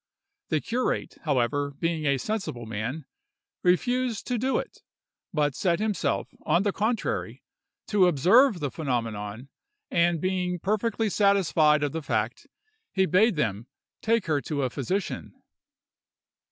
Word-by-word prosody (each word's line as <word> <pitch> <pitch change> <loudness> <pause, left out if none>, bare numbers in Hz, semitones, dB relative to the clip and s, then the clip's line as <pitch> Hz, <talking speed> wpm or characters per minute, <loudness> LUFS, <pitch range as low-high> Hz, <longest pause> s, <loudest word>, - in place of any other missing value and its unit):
The 155 - +2
curate, 250 +2 -2
however, 140 0 0
being 165 -1 -1
a 140 -1 +3
sensible 160 - -3
man, 115 +8 -4 0.6
refused 245 +6 +1
to 245 -2 -1
do 260 +3 +1
it, - - -5 0.5
but 150 -5 +1
set 170 +4 +1
himself, 210 -4 -1
on 175 - +2
the 205 - +1
contrary, 220 +2 -2 0.5
to 200 -4 +5
observe 185 - +4
the 145 -3 -2
phenomenon, 115 -4 -3 0.4
and 170 -1 +2
being 180 0 -1
perfectly 215 +4 0
satisfied 170 -7 +3
of 145 - 0
the 160 - -3
fact, 140 - -2 0.4
he 190 -1 +2
bade 205 +4 +3
them 115 -6 -1 0.3
take 230 -2 +1
her 150 -4 +1
to 145 +2 -2
a 130 - -1
physician. 185 +11 -3
170 Hz, 130 wpm, -26 LUFS, 140-205 Hz, 0.6 s, to